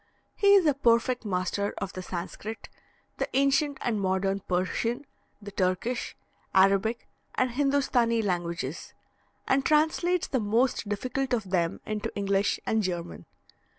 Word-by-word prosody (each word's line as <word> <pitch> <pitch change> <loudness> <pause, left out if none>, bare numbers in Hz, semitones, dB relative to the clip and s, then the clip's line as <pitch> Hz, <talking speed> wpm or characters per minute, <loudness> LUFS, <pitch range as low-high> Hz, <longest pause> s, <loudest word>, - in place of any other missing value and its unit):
He 400 0 +5
is 385 -4 +5
a 295 - +4
perfect 245 -2 +2
master 185 +1 -1
of 195 -2 -4
the 185 - -5
Sanscrit, 190 +5 -6 0.5
the - - -2
ancient 275 +1 +2
and 220 -4 -1
modern 195 +1 0
Persian, 200 +8 -1 0.3
the 205 -1 -9
Turkish, 195 +6 -1 0.4
Arabic, 195 +4 +3 0.3
and 255 -1 +1
Hindostanee 250 -4 +2
languages, 170 -6 -3 0.5
and 270 0 +3
translates 320 +4 +2
the 260 - -1
most 225 +1 +1
difficult 255 +5 -2
of 215 -6 -2
them 170 -3 0
into 215 -1 -3
English 200 0 +1
and 220 0 +1
German. 175 -3 -4
220 Hz, 130 wpm, -28 LUFS, 190-260 Hz, 0.5 s, He